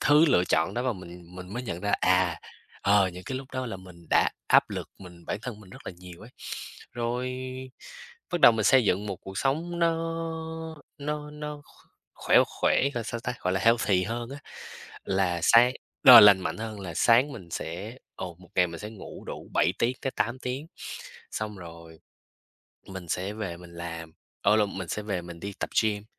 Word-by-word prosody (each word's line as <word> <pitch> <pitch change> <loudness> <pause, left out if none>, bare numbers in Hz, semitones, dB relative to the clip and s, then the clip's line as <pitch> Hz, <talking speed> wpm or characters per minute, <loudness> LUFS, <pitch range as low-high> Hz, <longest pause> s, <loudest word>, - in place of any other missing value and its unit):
thứ 150 +2 +6
lựa 90 -11 +4
chọn - - +1
đó 120 - -1
và 130 -2 0
mình 90 -2 -11
mình 90 +1 -9
mới 125 +2 -4
nhận 90 -7 -5
ra, 100 - -1
à, 90 -2 +2 0.4
ờ, 100 -1 +4
những 90 +1 -9
cái 130 - -3
lúc 135 0 -11
đó 130 0 -3
là 110 -5 -5
mình 90 -3 -14
đã - - +4 0.2
áp - - +5
lực - - -5
mình 90 -3 -13
bản - - -3
thân 115 -4 -6
mình 95 -3 -15
rất - - -13
là - - -4
nhiều 90 0 -12
ấy. 115 +4 -12 0.6
Rồi, 120 +2 -2 1.0
bắt 175 - 0
đầu 120 - +9
mình 110 -2 -1
xây 130 -1 +6
dựng 100 +2 +1
một 100 - -4
cuộc 95 +2 -8
sống 165 - -1
nó 170 -1 +3 1.0
nó 150 +1 -4
nó 150 -1 -7
kh - - -23 0.3
khỏe - - +4
khỏe, - - +1
gọi 120 -2 -2
sao 115 +1 -4
ta? 125 +1 -3
Gọi 90 - 0
là 95 - 0
healthy 110 -5 +3
hơn 115 +3 -4
á. 140 - -7 0.7
Là 95 -3 0
sáng 120 +5 +6 0.3
ờ, 120 -3 +13
lành 100 -2 +8
mạnh - - -3
hơn, 110 -2 -6
là 85 -4 -6
sáng 125 +8 +4
mình 95 -9 -10
sẽ 100 +11 -5 0.2
ồ, 90 -2 -6
một 90 -1 -17
ngày 90 - +4
mình 85 -1 -8
sẽ 105 +1 -6
ngủ 110 - -10
đủ - - -8
7 - - +3
tiếng 125 +2 +1
tới 135 - -1
8 115 +2 -2
tiếng, 130 +4 -4 0.7
xong 105 -2 -4
rồi 85 -2 -11 0.9
mình 95 -3 -8
sẽ 95 +5 -2
về 100 -6 -5
mình 85 0 -13
làm 85 -1 -7 0.3
ở 105 +2 +5
lộn, 105 -3 0
mình 95 -3 -5
sẽ 105 - -3
về 100 -4 -3
mình 85 -1 -10
đi 100 0 -5
tập - - -2
gym, 105 -1 -1
105 Hz, 205 wpm, -27 LUFS, 90-125 Hz, 1.0 s, ờ